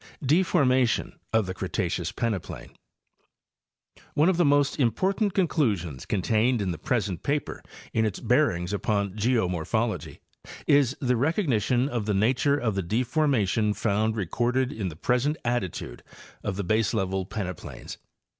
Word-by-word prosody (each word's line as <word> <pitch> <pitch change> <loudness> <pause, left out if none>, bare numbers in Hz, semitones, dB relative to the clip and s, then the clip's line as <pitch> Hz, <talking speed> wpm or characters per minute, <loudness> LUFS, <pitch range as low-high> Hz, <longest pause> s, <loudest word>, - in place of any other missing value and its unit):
DEFORMATION 135 -6 +2 0.2
OF 110 -2 +2
THE 95 - -4
CRETACEOUS - - -2
PENEPLAIN. 110 -6 -3 1.4
One 155 +5 +4
of 185 - +1
the 175 - +4
most 145 -1 +2
important 190 - +1
conclusions 105 - 0
contained 110 +5 +1
in 95 -3 -1
the 85 - -6
pres 120 -5 0
ent 90 -4 -5
paper, 145 +1 -2 0.3
in 110 - +2
its 110 -3 -1
bearings 90 +3 +1
upon 100 -1 0
geomorphology, 110 -1 -1 0.5
is 140 -2 +3
the 125 -2 +2
recognition 130 - +1
of 120 -6 -3
the 105 - +1
nature 125 +7 +2
of 115 -6 -1
the 95 - -1
deformation 110 - +1
found 110 +1 0
recorded 120 - 0
in 100 -4 -3
the 80 - -9
present 125 - 0
attitude 110 - -3 0.4
of 100 - -2
the 100 - -2
baselevel 95 -2 0
peneplains. 90 -5 -6
115 Hz, 135 wpm, -26 LUFS, 100-135 Hz, 1.4 s, One